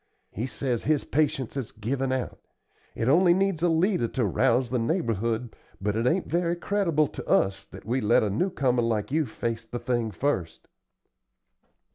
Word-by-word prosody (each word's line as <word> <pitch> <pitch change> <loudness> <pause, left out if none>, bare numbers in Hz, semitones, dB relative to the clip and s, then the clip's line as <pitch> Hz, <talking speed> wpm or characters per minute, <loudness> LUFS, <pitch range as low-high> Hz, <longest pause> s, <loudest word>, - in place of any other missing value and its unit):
He 115 +6 -3
says 125 -3 -2
his 150 -1 +2
patience 145 -5 0
has 135 -5 -4
given 130 +5 -2
out. 130 -1 -3 0.6
It 115 - -1
only 175 +5 +5
needs 195 -4 0
a 175 - +3
leader 165 - +2
to 125 0 -1
rouse 125 +5 +2
the 125 - +1
neighborhood, 115 - -1 0.2
but 100 +2 -1
it 115 +2 +1
ain't 175 +7 +1
very 170 0 0
creditable 175 -4 +1
to - - -8
us 100 +1 +2
that - - -13
we 125 +4 0
let 110 +1 +4
a 105 - 0
new 180 - +1
comer 125 -7 +1
like 115 -1 -1
you 155 -1 +1
face 115 +1 -3
the 115 +2 -6
thing 120 -1 -1
first." 95 - -2
125 Hz, 175 wpm, -26 LUFS, 115-155 Hz, 0.6 s, only